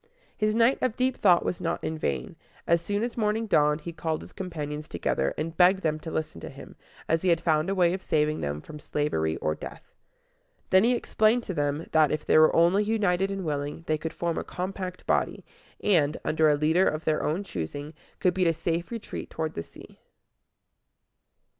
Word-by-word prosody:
His 215 -1 0
night 235 +3 +4
of 250 -3 0
deep 255 0 +1
thought 180 -4 +4
was 175 - -2
not - - -2
in 160 - -2
vain; 70 - -2 0.4
and - - +2
as 170 - +3
soon 205 +3 -1
as 240 0 -3
morning 220 0 0
dawned 150 -6 +3
he 170 +2 -6
called 160 -1 -2
his - - -13
companions 150 -5 -5
together, 65 - -1
and 165 +2 -3
begged 185 +2 +5
them 155 -1 0
to 160 - -7
listen 155 - -4
to - - -7
him, - - -12 0.3
as 165 0 +1
he 185 - +1
had 170 -1 +4
found 160 0 +1
a 195 - 0
way 175 -2 +3
of 190 - -4
saving 155 -2 0
them 75 +1 -3
from 150 - -10
slavery 80 - -1
or 75 - -1
death. - - -10 0.8
Then 190 +1 +6
he 245 +2 +3
explained 230 +1 +2
to 190 - -4
them, 145 0 -1
that, 155 -2 +4
if 150 - -2
they - - +5
were 155 - +5
only 175 +5 +4
united 200 -3 +1
and 195 -2 -4
willing, 145 +1 -3
they 155 -1 0
could 160 - -4
form 170 -1 -2
a - - -4
compact 185 0 -5
body, - - 0 0.4
and, 160 -7 +3
under 155 0 +3
a 150 - +4
leader 160 +5 +3
of 155 +1 -2
their 155 -1 +1
own 165 +7 -1
choosing, 145 - -5 0.3
could 180 - +2
beat 185 -1 +2
a 165 - +3
safe 165 +1 -2
retreat 230 -2 -6
toward 160 -1 -3
the - - -4
sea. - - -14
165 Hz, 210 wpm, -27 LUFS, 150-190 Hz, 0.8 s, Then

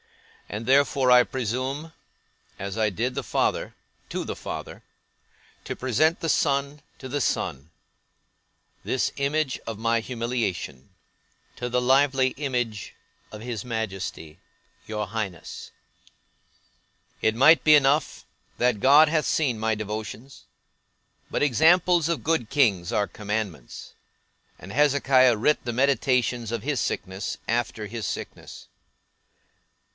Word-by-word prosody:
And 105 +2 -5
therefore, 135 0 +3
I 125 0 +8
presume 130 +7 -3 0.7
(as 100 +1 -5
I 110 -1 +2
did 120 +6 -2
the - - -3
father, - - -1 0.4
to - - -3
the - - -4
Father) - - -7 0.8
to - - -5
present 145 +7 +1
the 165 - -3
son 140 -1 0 0.2
to 130 - -8
the 140 +2 -2
Son; 70 - -2 1.1
this 130 - -1
image 140 0 -1
of 115 -2 -5
my 115 0 +1
humiliation, 115 - -3 0.7
to 125 - -4
the 125 +1 +1
lively 130 +1 +3
image 120 -7 -3 0.4
of 105 - -8
his 115 -2 -5
Majesty, 95 -8 -5 0.5
your 105 -1 -3
Highness. 100 -5 -6 1.5
It 110 0 +2
might 155 +7 +6
be 155 -1 +7
enough, 145 +1 +2 0.3
that 120 -4 +1
God 145 +4 +7
hath 155 0 +1
seen 135 -8 +1
my 110 +1 0
devotions: 110 +5 -7 0.9
but - - -1
examples 165 +4 +4
of 170 - -2
good 155 -8 0
kings 105 - +2
are 100 - +1
commandments; 105 - -5 0.7
and 95 - -10
Hezekiah 135 -4 +4
writ 150 +8 +2
the 120 - -3
meditations 125 -2 +1
of 115 -3 -3
his 145 0 -1
sickness, 95 +1 -3
after 115 -2 -1
his 110 +1 -5
sickness. - - -7
125 Hz, 120 wpm, -25 LUFS, 110-140 Hz, 1.5 s, I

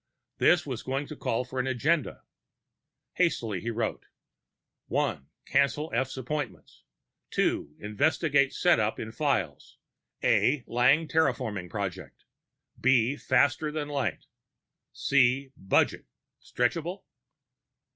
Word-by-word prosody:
This - - +4
was - - -4
going 135 +2 -2
to 155 - -8
call 125 -2 -1
for 130 +1 -5
an 130 - 0
agenda. 140 +4 0 0.9
Hastily 115 - 0
he 120 - -3
wrote: 115 -1 -3 0.8
1. 70 +1 -1 0.2
Cancel 140 +3 +1
F's 130 +3 -1
appointments 145 +3 -5 0.5
2. 75 +1 0
Investigate 140 +5 +1
setup 110 -12 +2
in 110 - -5
Files 115 - -2 0.5
a) 130 0 +3
Lang 130 +7 +3
terraforming 115 - 0
project 95 -3 -6 0.6
b) 130 +1 +3
faster 140 +2 +2
than 150 -1 -4
light 135 - -2 0.7
_c) 135 0 +2
budget 95 - +1 0.3
stretchable? 165 +9 -2
130 Hz, 105 wpm, -28 LUFS, 115-145 Hz, 0.9 s, This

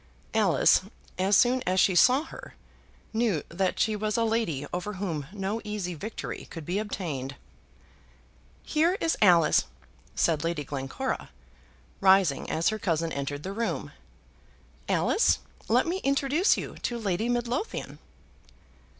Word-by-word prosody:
Alice, 210 -6 +4 0.4
as 195 +2 +4
soon 250 +1 +4
as 185 +1 +2
she 190 - +4
saw 255 - +5
her, - - -11 0.6
knew 220 -8 +1
that 185 +2 -1
she 220 -1 +2
was 215 +1 -1
a 230 - +2
lady 220 -11 0
over 180 +4 -3
whom 170 -8 -4
no 205 +2 -3
easy 210 -4 -4
victory 205 +8 -6
could 165 -3 -8
be 180 +5 -1
obtained. 155 -10 -4 1.3
"Here 335 +5 +2
is 330 - +1
Alice," 175 - +5 0.5
said 160 -2 +1
Lady 165 -3 -1
Glencora, 135 -1 -4 0.7
rising 190 -7 +4
as 165 +1 +1
her 215 0 -3
cousin 165 -4 0
entered 145 +1 -4
the 190 - -4
room. 230 +2 -3 1.0
"Alice, 450 - +3 0.3
let - - +3
me 345 +2 -1
introduce 280 +3 +2
you - - -6
to 240 - -2
Lady 215 +1 -1
Midlothian." 245 - -2
195 Hz, 135 wpm, -27 LUFS, 165-230 Hz, 1.3 s, saw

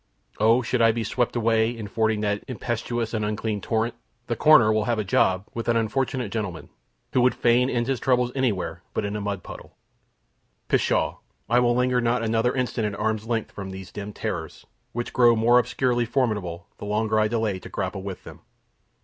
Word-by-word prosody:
O, 115 +4 +4
should 120 +1 0
I 115 0 +6
be 115 0 -2
swept 120 +3 -1
away 115 -1 +2
in 115 -3 -6
fording 110 0 0
that 105 -1 -1
impetuous 120 -1 -3
and 110 -2 -1
unclean 105 0 -2
torrent, 115 +2 0 0.3
the 120 - -2
coroner 120 -8 +6
will 110 -1 +1
have 120 0 0
a 110 - 0
job 95 0 +2
with 115 - -5
an 120 -1 +3
unfortunate 120 0 -1
gentleman, 100 -7 -4 0.4
who 125 - +3
would 125 +1 +3
fain 125 +2 +3
end 120 -2 0
his 135 -1 -1
troubles 125 -2 +2
anywhere 95 -10 -1
but - - 0
in 100 +1 -3
a 105 - -3
mud 100 -3 -3
puddle! - - -11 0.9
Pshaw! - - +1 0.3
I 120 +1 +4
will 120 -1 +3
linger 125 0 +2
not 120 0 +1
another 115 +3 +1
instant 120 -4 -1
at 100 - -8
arm's 110 0 -1
length 115 -2 -2
from 95 -1 -7
these 95 -2 -8
dim 105 0 -6
terrors, 80 -5 -5 0.3
which 120 +1 -4
grow 120 -2 +5
more 120 +2 +5
obscurely 120 -1 0
formidable, 105 -9 -1
the - - -6
longer 110 +1 +1
I 110 - +3
delay 110 -4 -1
to - - -11
grapple 95 0 -3
with 95 -1 -7
them. - - -11
115 Hz, 195 wpm, -25 LUFS, 105-120 Hz, 0.9 s, I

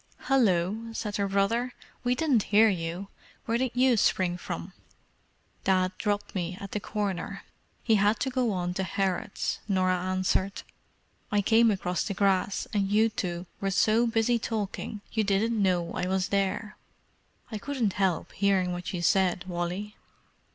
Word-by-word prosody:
"Hallo!" 220 -3 +1
said 210 -2 -3
her 200 -1 0
brother. 225 +6 0 0.3
"We 245 0 +2
didn't 270 -5 +2
hear 220 +2 +6
you—where 195 +6 -4
did 260 0 +1
you 255 0 +4
spring 185 -3 +2
from?" 85 - -6 0.9
"Dad 185 -1 +2
dropped 205 -1 -1
me 180 -1 -3
at 200 - -8
the 210 - -1
Corner—he 205 +2 -4
had 210 +1 +3
to 265 - 0
go 245 -3 +1
on 180 -2 -2
to 190 - -2
Harrods," 190 +1 -1
Norah 185 -2 +2
answered. 185 +1 0 0.7
"I 205 -1 +2
came 230 +2 +5
across 180 -4 -1
the 200 - -3
grass, 195 0 +1
and 200 -2 +1
you 215 +2 +4
two 175 -4 -3
were 195 - -1
so 215 +4 +3
busy 230 +1 +2
talking 210 -1 -4
you 220 - +1
didn't 210 +2 +1
know 175 -3 +1
I 180 - -2
was 190 0 0
there. 200 +2 -1 0.7
I 215 - -4
couldn't 240 -5 -1
help 190 -4 0
hearing 190 -2 +1
what 175 +1 -5
you 175 -1 -3
said, 180 -1 +2
Wally." 180 +4 -4
200 Hz, 150 wpm, -28 LUFS, 185-220 Hz, 0.9 s, hear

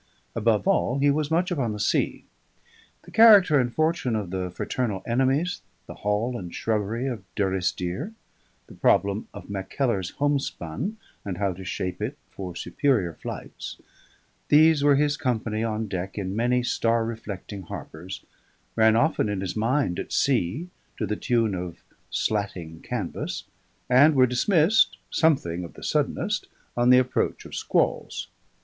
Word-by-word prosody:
Above 110 - +1
all, 165 -9 +2
he 140 +1 +4
was 150 0 0
much 175 +3 +1
upon 130 -10 0
the 105 - -6
sea. 105 - 0 0.8
The - - -14
character 205 -10 +7
and 120 -2 0
fortune 155 -5 0
of 100 -5 -3
the 95 -1 -2
fraternal 100 +2 -3
enemies, 135 +8 +1 0.2
the - - -8
hall 105 +4 -1
and 90 -7 -6
shrubbery 110 +4 -1
of 120 -6 -3
Durrisdeer, 95 - -1 0.5
the - - -14
problem 100 +1 +2
of - - -10
Mackellar's 100 0 -1
homespun 145 - -1 0.3
and 95 -3 -4
how 100 -2 0
to 95 +2 -9
shape 90 +1 -4
it 125 +7 -3
for 90 -3 -7
superior 110 - 0
flights; - - -7 0.7
these 155 0 +6
were 145 -1 +6
his 145 +1 +2
company 115 -5 -1
on 110 -1 -2
deck 95 0 -4
in 95 -1 -3
many 125 +2 +2
star 115 -1 +1
reflecting 105 -3 -6
harbours, 90 +1 -8 0.5
ran 110 -1 +5
often 115 -3 +2
in 100 -2 -2
his 95 -2 -3
mind 115 -4 +1
at - - -6
sea 135 - +1 0.3
to 110 - -1
the 105 +1 -2
tune 115 -3 +1
of 90 -2 -6 0.3
slatting 95 -6 -2
canvas, 110 -8 -4 0.4
and 140 +5 +6
were 130 -1 +6
dismissed 160 - +3
(something 90 - +2
of 85 - -9
the - - -11
suddenest) - - 0 0.3
on 120 +1 +3
the 125 - +8
approach 130 0 0
of - - -11
squalls. - - -1
115 Hz, 150 wpm, -25 LUFS, 95-140 Hz, 0.8 s, the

